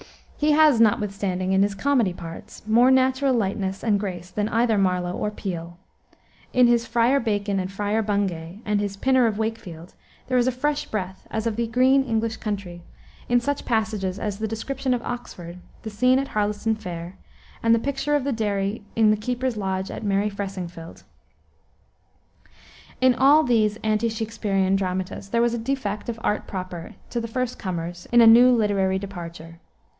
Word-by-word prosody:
He 300 Hz, 0 st, +2 dB
has, 300 Hz, -6 st, +5 dB
notwithstanding, 200 Hz, -4 st, +1 dB
in 190 Hz, -, +4 dB
his 200 Hz, 0 st, +1 dB
comedy 245 Hz, -7 st, +1 dB
parts, 165 Hz, +4 st, -10 dB
more 235 Hz, +4 st, +5 dB
natural 260 Hz, 0 st, +3 dB
lightness 195 Hz, -3 st, -2 dB
and 210 Hz, -3 st, +2 dB
grace 180 Hz, -3 st, -5 dB
than 210 Hz, 0 st, -1 dB
either 230 Hz, -1 st, +2 dB
Marlowe 180 Hz, -2 st, +1 dB
or 210 Hz, -, -2 dB
Peele. 175 Hz, -5 st, -6 dB, 0.7 s
In 250 Hz, -1 st, +5 dB
his 235 Hz, -1 st, +3 dB
Friar 240 Hz, +4 st, +3 dB
Bacon 205 Hz, -4 st, -1 dB
and 185 Hz, 0 st, -3 dB
Friar 205 Hz, +2 st, -1 dB
Bungay, 200 Hz, -2 st, -2 dB
and 210 Hz, -1 st, +1 dB
his 200 Hz, -1 st, -3 dB
Pinner 260 Hz, +2 st, +3 dB
of 215 Hz, -2 st, -2 dB
Wakefield, 205 Hz, -7 st, -5 dB, 0.3 s
there 255 Hz, -1 st, +1 dB
is 245 Hz, -, +2 dB
a -, -, +3 dB
fresh 290 Hz, +4 st, -2 dB
breath, 190 Hz, -3 st, -5 dB
as 220 Hz, 0 st, -3 dB
of 225 Hz, -2 st, -1 dB
the 235 Hz, 0 st, 0 dB
green 260 Hz, +4 st, +4 dB
English 225 Hz, -2 st, -1 dB
country, 195 Hz, -5 st, -5 dB, 0.5 s
in 245 Hz, 0 st, +4 dB
such 285 Hz, +4 st, -3 dB
passages 215 Hz, -5 st, -1 dB
as 205 Hz, -1 st, -4 dB
the 220 Hz, -, -1 dB
description 255 Hz, +4 st, -2 dB
of 240 Hz, -, -5 dB
Oxford, 180 Hz, -8 st, -7 dB, 0.2 s
the 220 Hz, -, -6 dB
scene 255 Hz, +5 st, +3 dB
at 275 Hz, 0 st, -2 dB
Harleston 210 Hz, +1 st, 0 dB
Fair, 180 Hz, -3 st, -7 dB, 0.4 s
and 230 Hz, 0 st, +4 dB
the -, -, +1 dB
picture 280 Hz, +3 st, -1 dB
of 290 Hz, -, +1 dB
the 280 Hz, -, -1 dB
dairy 205 Hz, -2 st, -2 dB
in 220 Hz, -1 st, +5 dB
the 215 Hz, -, +2 dB
keeper's 250 Hz, +3 st, -2 dB
lodge 190 Hz, -1 st, -2 dB
at -, -, -7 dB
merry 205 Hz, 0 st, +1 dB
Fressingfield. 185 Hz, -4 st, -7 dB, 2.0 s
In 255 Hz, 0 st, +5 dB
all 280 Hz, +5 st, +5 dB
these 215 Hz, -5 st, +2 dB
ante 215 Hz, +1 st, +1 dB
Shaksperian 210 Hz, -4 st, -1 dB
dramatists 185 Hz, 0 st, -3 dB
there 235 Hz, +2 st, +1 dB
was 240 Hz, 0 st, +1 dB
a 235 Hz, -, -2 dB
defect 225 Hz, -4 st, -3 dB
of 230 Hz, -1 st, -4 dB
art 210 Hz, -, -1 dB
proper 180 Hz, -3 st, -6 dB, 0.2 s
to 240 Hz, -, -1 dB
the 230 Hz, -, -4 dB
first 250 Hz, +1 st, -3 dB
comers 175 Hz, -1 st, -5 dB
in 240 Hz, 0 st, +6 dB
a -, -, +8 dB
new 240 Hz, +3 st, +8 dB
literary 200 Hz, -5 st, +2 dB
departure. 170 Hz, -4 st, -8 dB
215 Hz, 175 wpm, -24 LUFS, 190-240 Hz, 2.0 s, a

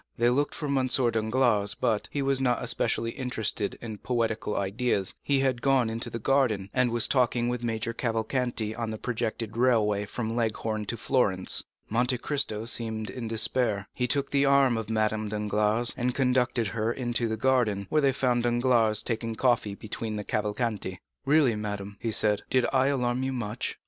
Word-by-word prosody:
They 120 Hz, +1 st, +3 dB
looked 145 Hz, +3 st, 0 dB
for 155 Hz, -, -4 dB
M. 135 Hz, -2 st, +1 dB
Danglars, 115 Hz, -3 st, +2 dB
but, 115 Hz, -4 st, 0 dB
as -, -, -29 dB
he 140 Hz, -, -2 dB
was 135 Hz, -1 st, +1 dB
not 125 Hz, -2 st, +1 dB
especially 115 Hz, 0 st, 0 dB
interested 110 Hz, -5 st, -2 dB
in 110 Hz, -3 st, -6 dB
poetical 115 Hz, -3 st, -1 dB
ideas, 100 Hz, 0 st, -1 dB
he 140 Hz, -1 st, +1 dB
had 130 Hz, -3 st, 0 dB
gone 130 Hz, -4 st, +2 dB
into 115 Hz, +2 st, -3 dB
the 115 Hz, -, -5 dB
garden, 115 Hz, -6 st, +1 dB
and 125 Hz, -1 st, +2 dB
was 120 Hz, -1 st, +2 dB
talking 120 Hz, -2 st, +2 dB
with 120 Hz, -1 st, -3 dB
Major 115 Hz, 0 st, -2 dB
Cavalcanti 115 Hz, -1 st, -1 dB
on 115 Hz, -1 st, -3 dB
the 110 Hz, -, -4 dB
projected 110 Hz, -1 st, -3 dB
railway 110 Hz, -5 st, +2 dB
from 115 Hz, +1 st, -3 dB
Leghorn 110 Hz, -2 st, -1 dB
to 115 Hz, -, -4 dB
Florence. 100 Hz, -5 st, +2 dB, 0.2 s
Monte 125 Hz, +3 st, +1 dB
Cristo 125 Hz, -5 st, -1 dB
seemed 110 Hz, -2 st, -1 dB
in 120 Hz, -3 st, -5 dB
despair. 110 Hz, -2 st, +1 dB
He 125 Hz, -, -1 dB
took 140 Hz, +2 st, 0 dB
the 140 Hz, 0 st, +3 dB
arm 140 Hz, -3 st, +4 dB
of 115 Hz, -1 st, -4 dB
Madame 110 Hz, -1 st, 0 dB
Danglars, 105 Hz, +2 st, +1 dB
and 125 Hz, 0 st, -1 dB
conducted 125 Hz, -4 st, +1 dB
her 110 Hz, +1 st, -1 dB
into 120 Hz, -1 st, -1 dB
the 110 Hz, 0 st, -2 dB
garden, 115 Hz, -5 st, +1 dB
where 155 Hz, -, +3 dB
they 140 Hz, -1 st, +3 dB
found 125 Hz, -2 st, +1 dB
Danglars 120 Hz, -3 st, +2 dB
taking 115 Hz, -1 st, -3 dB
coffee 115 Hz, -5 st, +1 dB
between 110 Hz, +1 st, -5 dB
the 105 Hz, -, -4 dB
Cavalcanti. 105 Hz, -3 st, -2 dB, 0.3 s
"Really, 140 Hz, -5 st, +4 dB
madame," 105 Hz, -1 st, -5 dB
he 115 Hz, -, -2 dB
said, 105 Hz, -1 st, +3 dB
"did 130 Hz, -1 st, +2 dB
I 130 Hz, 0 st, +3 dB
alarm 125 Hz, -2 st, 0 dB
you 130 Hz, 0 st, -2 dB
much?" 115 Hz, -2 st, -4 dB
115 Hz, 180 wpm, -27 LUFS, 110-125 Hz, 0.3 s, arm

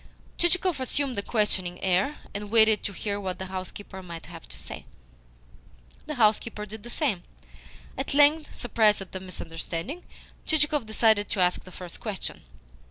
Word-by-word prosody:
Chichikov 350 Hz, -2 st, +2 dB
assumed 260 Hz, -2 st, -1 dB
a -, -, 0 dB
questioning 195 Hz, -5 st, 0 dB
air, 190 Hz, +10 st, +2 dB, 0.2 s
and 205 Hz, 0 st, -4 dB
waited 220 Hz, -1 st, +6 dB
to -, -, -2 dB
hear 200 Hz, +1 st, -3 dB
what 185 Hz, -2 st, -3 dB
the 190 Hz, -, -4 dB
housekeeper 190 Hz, +1 st, -6 dB
might 170 Hz, -2 st, -8 dB
have -, -, -11 dB
to -, -, -5 dB
say. -, -, -8 dB, 1.2 s
The 300 Hz, -, -3 dB
housekeeper 215 Hz, -2 st, +2 dB
did 215 Hz, +1 st, -7 dB
the 240 Hz, -, -9 dB
same. 240 Hz, -, 0 dB, 0.7 s
At 270 Hz, +1 st, -2 dB
length, 295 Hz, +2 st, +5 dB
surprised 220 Hz, -4 st, +3 dB
at 190 Hz, -, -16 dB
the 190 Hz, -, -4 dB
misunderstanding, 180 Hz, -, -5 dB, 0.4 s
Chichikov 295 Hz, -5 st, +2 dB
decided 220 Hz, -1 st, +3 dB
to 205 Hz, -, -2 dB
ask 180 Hz, 0 st, +3 dB
the 185 Hz, -, -10 dB
first 180 Hz, -1 st, -8 dB
question. 210 Hz, -4 st, -3 dB
210 Hz, 160 wpm, -27 LUFS, 185-260 Hz, 1.2 s, waited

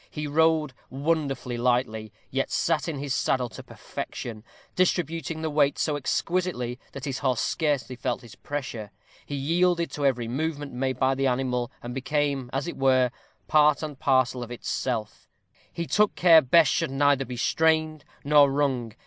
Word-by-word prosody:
He 150 Hz, -1 st, -5 dB
rode 155 Hz, -1 st, +2 dB, 0.2 s
wonderfully 140 Hz, -4 st, -1 dB
lightly, 120 Hz, -3 st, 0 dB, 0.2 s
yet -, -, -1 dB
sat -, -, 0 dB
his 145 Hz, -4 st, -3 dB
saddle 125 Hz, -2 st, 0 dB
to -, -, -10 dB
perfection, 110 Hz, -3 st, -7 dB, 0.3 s
distributing 165 Hz, -3 st, 0 dB
the 160 Hz, -, 0 dB
weight 145 Hz, -1 st, +2 dB
so 150 Hz, -, 0 dB
exquisitely 145 Hz, -4 st, -1 dB
that 140 Hz, -, -6 dB
his 135 Hz, -2 st, -3 dB
horse 130 Hz, -4 st, 0 dB
scarcely 145 Hz, -5 st, -1 dB
felt 125 Hz, 0 st, -3 dB
his 115 Hz, -, -12 dB
pressure; 130 Hz, -7 st, -5 dB, 0.4 s
he 145 Hz, -, -4 dB
yielded 170 Hz, +4 st, +1 dB
to 145 Hz, -, -4 dB
every 125 Hz, -4 st, +1 dB
movement 145 Hz, +2 st, -3 dB
made 130 Hz, +1 st, -2 dB
by 130 Hz, 0 st, +2 dB
the 135 Hz, 0 st, 0 dB
animal, 125 Hz, -1 st, -1 dB
and 120 Hz, 0 st, -5 dB
became, 140 Hz, -1 st, -1 dB
as 135 Hz, +3 st, -2 dB
it 170 Hz, -, -5 dB
were, 130 Hz, -2 st, +3 dB, 0.4 s
part 150 Hz, 0 st, +4 dB
and 150 Hz, -3 st, -6 dB
parcel 130 Hz, -2 st, +2 dB
of 120 Hz, -, -6 dB
itself; 120 Hz, -2 st, -4 dB, 0.4 s
he 170 Hz, -, -4 dB
took 210 Hz, +4 st, +2 dB
care 165 Hz, -3 st, +7 dB
Bess 155 Hz, +4 st, +5 dB
should 170 Hz, -2 st, 0 dB
be 135 Hz, -, -6 dB
neither 135 Hz, -3 st, +2 dB
strained 155 Hz, +2 st, +1 dB, 0.2 s
nor 145 Hz, -1 st, +6 dB
wrung. 130 Hz, -5 st, 0 dB
140 Hz, 160 wpm, -26 LUFS, 125-155 Hz, 0.4 s, care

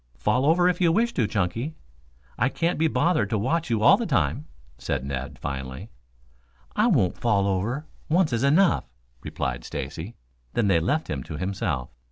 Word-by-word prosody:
"Fall 125 Hz, -, +1 dB
over 175 Hz, +3 st, +4 dB
if 180 Hz, 0 st, 0 dB
you 170 Hz, -2 st, +4 dB
wish 235 Hz, +6 st, +1 dB
to, 115 Hz, -, +1 dB
Chunky. 110 Hz, -, -2 dB, 0.6 s
I 125 Hz, -, +1 dB
can't 165 Hz, +5 st, -1 dB
be 160 Hz, -, +4 dB
bothered 150 Hz, -, +1 dB
to 110 Hz, -, 0 dB
watch 155 Hz, +9 st, 0 dB
you 110 Hz, -2 st, +1 dB
all -, -, +7 dB
the 235 Hz, -, -3 dB
time," 145 Hz, 0 st, 0 dB, 0.3 s
said 65 Hz, +2 st, -2 dB
Ned 65 Hz, -1 st, -5 dB
finally. 65 Hz, -, -6 dB, 0.8 s
"I 215 Hz, -, +3 dB
won't 120 Hz, -, +2 dB
fall 100 Hz, -4 st, +2 dB
over. 105 Hz, +10 st, -1 dB, 0.2 s
Once 165 Hz, -3 st, +2 dB
is 115 Hz, +2 st, 0 dB
enough," 165 Hz, +7 st, +4 dB, 0.4 s
replied -, -, -3 dB
Stacy, 90 Hz, +8 st, -6 dB, 0.4 s
then 105 Hz, -4 st, +2 dB
they 85 Hz, -4 st, +4 dB
left 145 Hz, -, 0 dB
him 70 Hz, -3 st, -3 dB
to 75 Hz, -, -6 dB
himself. 90 Hz, -8 st, -2 dB
115 Hz, 175 wpm, -25 LUFS, -, 0.8 s, all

